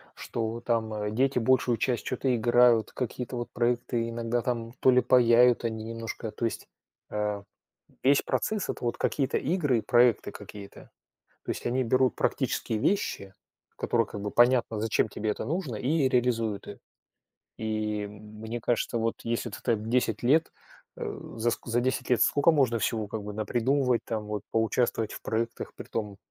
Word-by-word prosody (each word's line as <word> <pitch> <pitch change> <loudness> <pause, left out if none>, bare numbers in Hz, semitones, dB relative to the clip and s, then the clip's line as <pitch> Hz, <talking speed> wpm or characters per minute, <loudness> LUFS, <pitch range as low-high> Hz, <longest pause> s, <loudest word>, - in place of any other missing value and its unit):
что 115 0 -4
там, 115 -2 -1
э, 105 0 -2
дети 130 +4 +2
большую 120 0 +2
часть 120 +2 -1
чё-то 130 0 0
играют, 120 -1 +4
какие-то 125 0 -4
вот 120 - -4
проекты 120 -1 0
иногда, 115 +1 -1
там, 115 -1 -3
то 130 - +5
ли 125 0 +5
паяют 125 -1 +5
они 110 -1 -3
немножко, 115 -1 -5
то 120 - -3
есть, 110 -3 -3 0.4
э, 105 -1 -2 0.6
весь 140 +2 +5
процесс- 215 -2 -1
это - - -4
вот 120 - -1
какие-то 135 -2 0
игры 145 -5 +1
и - - -4
проекты 120 -1 +3
какие-то. 100 -1 -11 0.6
То - - -1
есть - - -6
они 130 +2 +1
берут 130 +1 +2
практические 110 - -1
вещи, 105 - -1 0.4
которые 115 -1 +1
как 100 - -7
бы 105 0 -3
понятно, 120 -2 +3
зачем 110 0 +1
тебе 105 +1 -3
это - - -4
нужно, 160 - -2
и 135 +4 +1
реализуют 115 -4 0
их. - - -9 0.8
И 105 -1 -2
мне 110 +3 -8
кажется, 115 0 0
вот, 115 0 -1
если 115 0 -2
ты 105 - -8
там 110 -3 0
10 120 -3 +1
лет, 155 +7 +3 0.4
э, - - -5 0.2
за 115 +1 +1
ск - - -5
за 120 +1 +1
10 130 +2 -1
лет 120 -3 +4
скока 145 +3 +4
можно 130 -6 +2
всего 110 -1 -1
как 110 0 -4
бы 105 - -5
напридумывать, 120 +4 +1
там, 110 -2 -3
вот 105 -1 -4
поучаствовать 115 -1 +1
в - - -8
проектах, 115 +1 -3
притом 105 -3 -5
115 Hz, 170 wpm, -28 LUFS, 110-125 Hz, 0.8 s, то